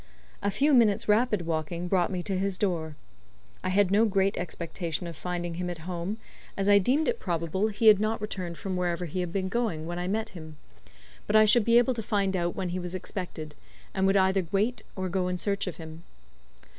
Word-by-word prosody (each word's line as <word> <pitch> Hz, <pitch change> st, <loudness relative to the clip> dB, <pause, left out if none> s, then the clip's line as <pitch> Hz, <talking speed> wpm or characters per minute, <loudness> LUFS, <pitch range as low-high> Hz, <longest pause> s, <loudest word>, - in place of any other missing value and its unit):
A 200 Hz, -, +1 dB
few 285 Hz, +8 st, +2 dB
minutes' 225 Hz, -6 st, +4 dB
rapid 210 Hz, -4 st, +2 dB
walking 165 Hz, +2 st, -2 dB
brought 180 Hz, -1 st, +2 dB
me 180 Hz, -2 st, -3 dB
to 195 Hz, 0 st, -2 dB
his 190 Hz, 0 st, 0 dB
door. 165 Hz, -6 st, -1 dB, 0.7 s
I -, -, -1 dB
had 195 Hz, 0 st, +3 dB
no 210 Hz, +3 st, +5 dB
great 195 Hz, -1 st, +1 dB
expectation 170 Hz, -1 st, -4 dB
of 170 Hz, -1 st, -6 dB
finding 175 Hz, +1 st, -4 dB
him 180 Hz, +1 st, -3 dB
at 175 Hz, -, -4 dB
home, 180 Hz, +3 st, -3 dB, 0.4 s
as 195 Hz, 0 st, 0 dB
I 205 Hz, 0 st, +7 dB
deemed 265 Hz, +11 st, +2 dB
it 475 Hz, -, 0 dB
probable 170 Hz, +3 st, -1 dB
he 215 Hz, +1 st, -2 dB
had 215 Hz, -2 st, +8 dB
not 215 Hz, +1 st, 0 dB
returned 185 Hz, -5 st, -5 dB
from 190 Hz, -2 st, -4 dB
wherever 175 Hz, -1 st, -1 dB
he 175 Hz, +3 st, -4 dB
had 180 Hz, -2 st, -2 dB
been 190 Hz, 0 st, -1 dB
going 195 Hz, -7 st, -1 dB
when 175 Hz, +1 st, -4 dB
I 180 Hz, -, -2 dB
met 220 Hz, +3 st, -1 dB
him; 155 Hz, -4 st, -10 dB, 0.7 s
but 215 Hz, -, 0 dB
I 215 Hz, 0 st, +8 dB
should 220 Hz, +2 st, +5 dB
be 235 Hz, 0 st, +5 dB
able 245 Hz, +2 st, +4 dB
to 230 Hz, -, -4 dB
find 200 Hz, -2 st, 0 dB
out 175 Hz, -1 st, -1 dB
when 185 Hz, -2 st, -2 dB
he 180 Hz, +1 st, -3 dB
was 175 Hz, 0 st, -5 dB
expected, 175 Hz, -5 st, -5 dB, 0.4 s
and 190 Hz, 0 st, +2 dB
would 195 Hz, +1 st, +4 dB
either 190 Hz, -1 st, +2 dB
wait 215 Hz, +4 st, 0 dB
or 185 Hz, -1 st, -2 dB
go 180 Hz, 0 st, -1 dB
in 180 Hz, 0 st, -1 dB
search 200 Hz, +1 st, -1 dB
of 180 Hz, -, -5 dB
him. 160 Hz, 0 st, -9 dB
185 Hz, 220 wpm, -28 LUFS, 175-205 Hz, 0.7 s, had